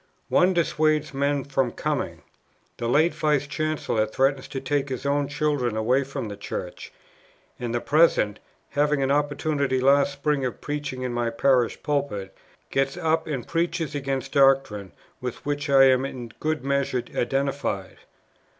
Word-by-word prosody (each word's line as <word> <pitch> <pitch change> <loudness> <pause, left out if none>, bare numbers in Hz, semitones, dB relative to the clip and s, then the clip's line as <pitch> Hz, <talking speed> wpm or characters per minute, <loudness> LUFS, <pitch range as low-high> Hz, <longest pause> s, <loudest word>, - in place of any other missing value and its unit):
One 180 +1 +4
dissuades 155 -2 +1
men 140 0 0
from 135 -3 0
coming; - - -3 0.5
the 115 - -3
late 155 +8 +3
Vice 150 -2 +1
Chancellor 150 -7 -1
threatens 135 +4 +1
to 135 - -4
take 140 +1 -1
his 130 +1 -5
own 140 0 +1
children 145 -6 0
away 125 +5 +2
from 135 -4 -5
the 100 - -6
Church; 90 -3 -6 0.7
and 120 -2 -3
the 120 0 -1
present, 145 -9 +3 0.3
having 145 -1 +2
an 135 - +1
opportunity 145 -2 0
last 140 +2 +4
spring 140 0 0
of 125 -2 -3
preaching 145 -3 -4
in 125 -1 -2
my 120 -1 0
parish 125 0 +1
pulpit, 140 -10 -2 0.4
gets 135 0 0
up 160 0 0
and 135 -6 -4
preaches 170 -2 -1
against 135 -2 -3
doctrine 135 - +3 0.3
with 125 -2 -5
which 145 0 -2
I 135 -1 +7
am 130 -1 +5
in 125 -3 -5
good 155 -2 -1
measure 140 -3 0
identified. 135 -7 -1
140 Hz, 150 wpm, -25 LUFS, 125-145 Hz, 0.7 s, I